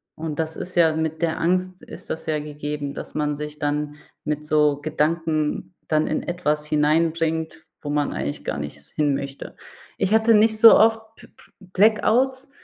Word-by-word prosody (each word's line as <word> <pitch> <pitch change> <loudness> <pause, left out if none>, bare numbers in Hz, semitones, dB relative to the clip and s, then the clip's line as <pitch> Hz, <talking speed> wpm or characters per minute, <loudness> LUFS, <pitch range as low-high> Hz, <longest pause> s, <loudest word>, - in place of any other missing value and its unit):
Und 160 -1 -5
das 160 0 -3
ist 180 - -6
ja 165 -2 +4
mit 160 +1 -3
der 165 -1 0
Angst 185 +2 0
ist - - -12
das 160 - -4
ja 155 -1 0
gegeben, 145 -1 -5
dass - - -9
man 150 -1 -1
sich 150 0 -7
dann 150 0 -2 0.3
mit 150 0 -3
so 150 -1 +2
Gedanken 155 +1 -1
dann 155 0 +1
in 155 - -2
etwas 150 -4 -2
hineinbringt, 160 +2 0 0.2
wo 145 - -6
man 145 0 0
eigentlich 70 +2 -4
gar - - -2
nicht 75 0 -6
s 70 - -19
hinmöchte. 140 -2 -3 0.4
Ich 195 - 0
hatte 225 +1 +4
nicht 220 +1 +3
so 225 0 +9
oft 225 +1 +4
B - - -16
B - - -22 0.3
Blackouts, 250 +6 +2
155 Hz, 175 wpm, -23 LUFS, 150-175 Hz, 0.4 s, so